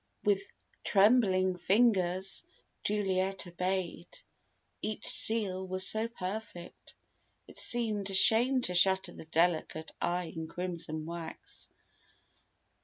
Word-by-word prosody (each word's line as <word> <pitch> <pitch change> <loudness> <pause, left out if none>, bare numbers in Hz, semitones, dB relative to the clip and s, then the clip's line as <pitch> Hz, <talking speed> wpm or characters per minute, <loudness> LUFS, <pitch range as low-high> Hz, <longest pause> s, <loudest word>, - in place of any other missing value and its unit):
With 200 -2 +2 0.4
trembling 195 -3 +3
fingers 190 - +1 0.4
Juliet 195 -2 -1
obeyed. 180 0 -3 0.7
Each 215 0 -5
seal 195 -4 +1
was 185 0 0
so 220 +3 +3
perfect, 200 -4 -8 0.5
it - - -8
seemed 215 -5 +3
a 195 - -3
shame 245 +6 +4
to 180 - -1
shatter 190 +1 +4
the 160 - -11
delicate 160 -1 -1
eye 175 -1 -2
in 160 0 -5
crimson 165 -3 -4
wax. 170 0 -8
190 Hz, 105 wpm, -31 LUFS, 175-210 Hz, 0.7 s, shame